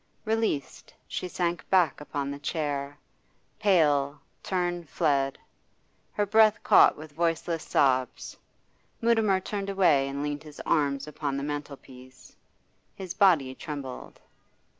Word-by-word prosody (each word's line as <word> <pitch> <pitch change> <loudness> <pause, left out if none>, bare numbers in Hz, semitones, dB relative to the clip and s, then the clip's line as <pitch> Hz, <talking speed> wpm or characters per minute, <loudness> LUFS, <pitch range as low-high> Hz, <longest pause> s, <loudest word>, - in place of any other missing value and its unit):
Released, 220 - -2
she - - -4
sank 175 -1 -3
back 175 -7 +3
upon 145 -1 -4
the 140 - -7
chair, 145 -2 -3 0.6
pale, 150 -8 +2 0.2
tern 175 -2 -2
fled; 140 -2 0 0.8
her 205 - 0
breath 215 +1 +4
caught - - +6
with 155 0 -10
voiceless 165 +1 -1
sobs. 130 -2 0 0.6
Mutimer 225 -4 +2
turned 200 +1 -4
away 170 -9 +3
and 140 +1 -4
leaned 145 0 -3
his 150 -2 -13
arms 140 -2 0
upon 145 -2 -4
the 140 - -3
mantelpiece. 135 -3 -8 0.6
His 185 -2 -6
body 165 -11 +3
trembled. 135 -2 -8
150 Hz, 120 wpm, -27 LUFS, 140-185 Hz, 0.8 s, caught